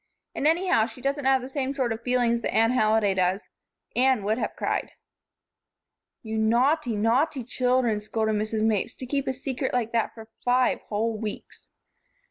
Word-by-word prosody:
And 290 - 0
anyhow, 335 -8 +3
she 255 - -12
doesn't 275 +2 -2
have 265 -1 +3
the - - -5
same 270 0 -3
sort 250 -4 0
of 225 - -8
feelings 240 -1 +1
that - - -2
Anne 225 +1 +3
Halliday 215 -4 +3
does. 185 +2 0 0.5
Anne 255 -3 +3
would 215 +4 0
have - - -3
cried." - - -2 1.3
"You 220 -1 -3
naughty, 245 +4 +2
naughty 250 +6 +1
children," 250 -3 +1
scolded 220 +1 -1
Mrs. 215 +1 -1
Mapes, 215 -3 0
"to 255 - -7
keep 275 +2 -2
a 265 - 0
secret 265 0 -3
like 230 -2 0
that 230 -2 -1
for 225 -1 -11
five 250 +1 +2
whole 220 +2 -1
weeks." 215 -2 -7
235 Hz, 170 wpm, -26 LUFS, 220-260 Hz, 1.3 s, anyhow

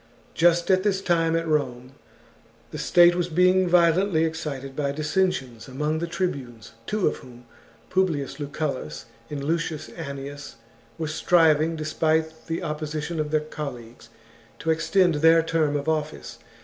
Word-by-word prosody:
Just 175 +2 +3
at 185 0 +4
this 195 -1 +1
time 165 -3 +1
at 165 0 -1
Rome 130 -5 -1 0.8
the - - -6
state 175 0 +5
was 175 0 -1
being 180 +2 +3
vio 170 -1 +5
chap. - - -1
lently 185 -5 +2
excited 145 -5 -5
by 140 -1 -1
dissensions 150 - -1
among 150 +4 -2
the 170 - -3
tribunes, 130 - -4 0.2
two 210 -2 +1
of - - -1
whom, 125 -1 -14 0.5
Publius 155 -7 0
Lucullus, 140 - -4 0.2
and 145 -2 -5
Lucius 160 0 -2
Annius, 140 -2 -7 0.4
were 160 - -3
striving, 160 0 +3
despite 160 0 -1
the 165 +3 -3
opposition 155 +1 -4
of 150 -1 -1
their 155 0 +1
colleagues, 125 -7 -8 0.5
to 160 - -1
extend 175 +2 +2
their 165 +2 +5
term 160 -3 0
of 145 +1 -3
office. 155 -1 -3
155 Hz, 150 wpm, -24 LUFS, 145-170 Hz, 0.8 s, state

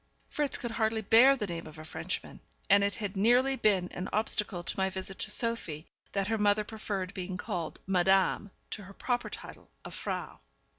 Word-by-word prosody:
Fritz 295 -2 0
could 240 -3 -4
hardly 220 -1 +1
bear 240 +7 +7
the 215 - -2
name 170 -3 -5
of 155 0 -12
a 155 - -9
Frenchman; - - -5 0.3
and 200 0 +7
it 200 0 +1
had 205 -2 -4
nearly 245 +7 +4
been 195 -7 +2
an 180 - -4
obstacle 210 -4 +1
to - - -2
my 190 0 +1
visit 190 0 -6
to - - +1
Sophie 210 -9 -2 0.3
that 195 -1 +1
her 220 +2 0
mother 205 0 +3
preferred 205 -4 -4
being 185 0 -4
called 170 -2 -4
Madame 190 +2 +3 0.2
to 205 - -5
her 195 - -11
proper 245 +4 -1
title - - -10 0.2
of - - -8
Frau. - - -4
200 Hz, 190 wpm, -30 LUFS, 185-225 Hz, 0.3 s, bear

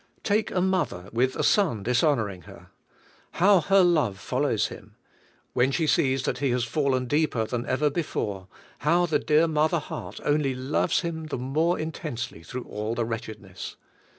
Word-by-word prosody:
Take 215 +1 +1
a 180 - 0
mother 180 - -1
with 130 +3 +1
a - - -1
son 160 - +2
dishonoring 120 - +1
her. - - -14 0.6
How 195 +2 +5
her 195 +2 +4
love 155 - +2
follows 125 +2 0
him! - - -12 0.6
When 125 +1 +3
she 160 +4 0
sees 135 -3 +2
that 125 -3 -2
he 140 -1 +1
has 125 0 +1
fallen 130 0 0
deeper 145 -4 +1
than 120 +1 -3
ever 145 +3 +1
before, 105 - -3 0.3
how 170 +4 +3
the 155 -4 +1
dear 155 +2 +3
mother 155 +2 +2
heart 155 - -6
only 145 -3 +1
loves 130 +4 0
him 160 -2 -4
the 155 - -3
more 155 +8 0
intensely 150 - -5
through 125 +10 -6
all 105 +1 -4
the 120 0 0
wretchedness! 110 -4 -6
135 Hz, 165 wpm, -26 LUFS, 115-160 Hz, 0.6 s, How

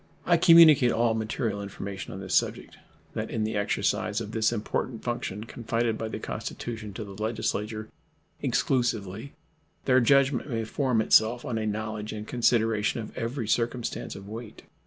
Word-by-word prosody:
I - - +5
communicate 160 -7 +7
all 115 0 +2
material 110 -1 -2
information 100 -1 -6
on 95 - -7
this 95 -1 -5
subject, - - 0 0.4
that - - -3
in 110 - -1
the 110 0 -2
exercise 105 +1 0
of 110 -2 -6
this 110 0 +2
important 115 +1 -3
function 115 -4 -3
confided 115 0 -1
by 110 - -2
the 110 - -5
Constitution 110 -3 -5
to 110 - -4
the 100 -1 -9
Legislature 110 -1 -2 0.5
exclusively 120 -4 -1 0.5
their 130 -1 +5
judgment 140 +2 +3
may 115 -3 -1
form 125 0 0
itself 110 +2 +4
on 115 -3 -2
a 110 - -2
knowledge 110 0 -3
and 105 0 -6
consideration 115 -2 +1
of 110 - -7
every 115 0 -3
circumstance 120 +1 -1
of 100 0 -10
weight. 110 +1 -9
110 Hz, 155 wpm, -27 LUFS, 105-120 Hz, 0.5 s, communicate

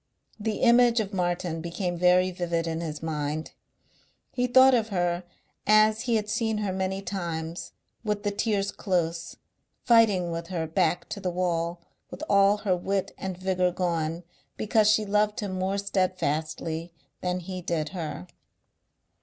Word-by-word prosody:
The 215 +2 -2
image 240 -1 +5
of 205 -2 -3
Martin 175 -2 -1
became 175 +2 -3
very 180 +1 +4
vivid 170 -2 -2
in 165 0 -2
his 155 -2 -5
mind. 155 -1 -3 0.8
He 250 0 0
thought 260 +1 +7
of 225 -3 +2
her 175 -2 0 0.4
as 215 +1 +5
he 235 -1 0
had 210 -1 0
seen 220 0 0
her 205 -3 -1
many 190 +1 -2
times, 170 -4 -4 0.3
with 210 -2 -2
the 205 - 0
tears 200 -1 0
close, 170 -3 -2 0.5
fighting 210 -7 +4
with 165 0 -4
her 170 -3 -2
back 175 +2 0
to 205 - -5
the 190 -2 -2
wall, 170 -1 -1 0.3
with - - -8
all 200 +1 +5
her 185 -3 +3
wit 195 +2 -2
and 190 -2 -4
vigour 185 -1 +1
gone, 170 -2 -2 0.3
because 215 0 +3
she 215 0 +3
loved 210 +2 +1
him 205 -2 -3
more 190 +2 0
steadfastly 170 -4 -1 0.3
than 180 0 -1
he 185 +1 -6
did 165 -3 -2
her. 165 - -5
185 Hz, 155 wpm, -27 LUFS, 170-210 Hz, 0.8 s, thought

